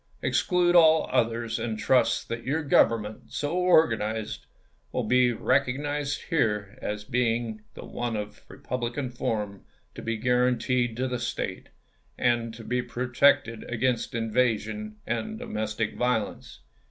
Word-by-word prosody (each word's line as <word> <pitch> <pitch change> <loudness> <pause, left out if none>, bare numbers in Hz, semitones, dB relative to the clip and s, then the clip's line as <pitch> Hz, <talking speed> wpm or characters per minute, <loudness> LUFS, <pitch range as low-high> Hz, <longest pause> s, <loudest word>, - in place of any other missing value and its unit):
Exclude 180 -1 +2
all 160 -2 +6
others; 115 -2 0
and 110 -2 -3
trust 125 +4 +2
that 115 0 -4
your 155 +5 -1
government 115 -6 +2
so 145 +2 -2
organized 115 -12 +2 0.4
will - - -1
be 125 -1 +4
recognized 140 +3 0
here 105 -10 0
as 105 0 -3
being 115 -2 -1
the - - -8
one 120 -2 -3
of 105 0 -6
republican 125 +1 -4
form 105 -5 -3 0.3
to - - -8
be 115 0 -2
guaranteed 125 0 +1
to 130 +1 0
the 125 -1 -3
State, 120 - -4 0.5
and 120 -2 +1
to 115 0 -10
be 125 +2 -1
protected 120 -1 +2
against 125 +1 -1
invasion 110 -2 0
and 120 - -3
do 245 - -7
mestic 110 - -2
violence. 125 -4 -2
120 Hz, 130 wpm, -27 LUFS, 110-130 Hz, 0.5 s, all